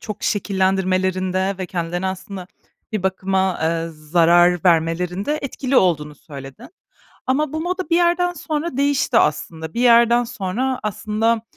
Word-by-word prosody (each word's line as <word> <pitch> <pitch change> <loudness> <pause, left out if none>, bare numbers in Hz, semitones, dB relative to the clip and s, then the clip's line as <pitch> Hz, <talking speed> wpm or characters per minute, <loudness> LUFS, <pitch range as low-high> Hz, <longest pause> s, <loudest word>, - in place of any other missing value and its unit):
çok 210 -2 -7
şekillendirmelerinde 190 -1 0
ve 185 - -4
kendilerine 175 +1 -3
aslında, 190 0 -6 0.5
bir 215 -4 -2
bakıma, 190 0 0
eee, 165 0 0
zarar 170 +3 +3
vermelerinde 180 - +1
etkili 270 -1 -2
olduğunu 150 -7 +2
söyledin. 135 -3 -11 0.6
Ama 275 +3 0
bu 315 - -3
moda 365 +2 -3
bir 335 - +4
yerden 350 +1 +2
sonra 310 -2 -4
değişti 280 -3 +2
aslında. 160 0 -1
Bir 235 - -2
yerden 235 0 +5
sonra 245 +3 -3
aslında, 215 +2 -1
190 Hz, 130 wpm, -20 LUFS, 175-245 Hz, 0.6 s, yerden